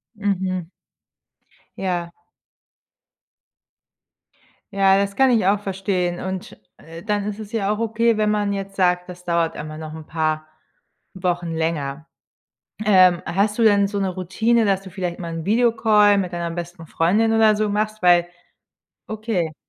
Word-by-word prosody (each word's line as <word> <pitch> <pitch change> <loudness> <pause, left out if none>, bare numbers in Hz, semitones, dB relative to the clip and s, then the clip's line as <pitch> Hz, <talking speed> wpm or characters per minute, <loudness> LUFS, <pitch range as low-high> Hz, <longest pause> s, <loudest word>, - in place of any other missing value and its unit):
Mhm. 190 -4 -2 1.1
Ja. 175 -3 -2 2.6
Ja, 195 -1 +4
das 200 0 -1
kann 265 -1 +4
ich 225 -5 +2
auch 200 +2 +3
verstehen. 185 -3 -2
Und, 190 0 -6 0.2
äh, 165 +1 -11
dann 205 -1 -1
ist 210 0 -5
es 215 -1 -9
ja 205 -3 0
auch 210 - -2
okay, 230 0 +1
wenn 215 0 +1
man 210 -1 0
jetzt 195 0 -5
sagt, 180 -1 +1
das 180 -1 -11
dauert 170 -2 0
immer 155 0 -7
noch 155 0 -8
'n 160 -1 -9
paar 155 -1 -2 0.7
Wochen 175 -2 -2
länger. 160 -2 -3 0.8
Ähm, 185 -4 +5
hast 205 +4 0
du 230 - +2
denn 205 -2 +5
so 200 0 -3
'ne 195 - 0
Routine, 220 +6 +1
dass 195 -2 +1
du 190 - -11
vielleicht 180 -2 -4
mal 170 -1 -5
'n 165 -1 -5
Video-Call 220 -2 +3
mit 180 -2 -2
deiner 170 -1 -3
besten 175 0 -7
Freundin 205 +9 +1
oder 220 -1 +5
so 210 0 0
machst? 215 +1 -2
Weil 175 -1 +4 0.8
okay. 215 -7 -3
190 Hz, 150 wpm, -21 LUFS, 175-210 Hz, 2.6 s, Ähm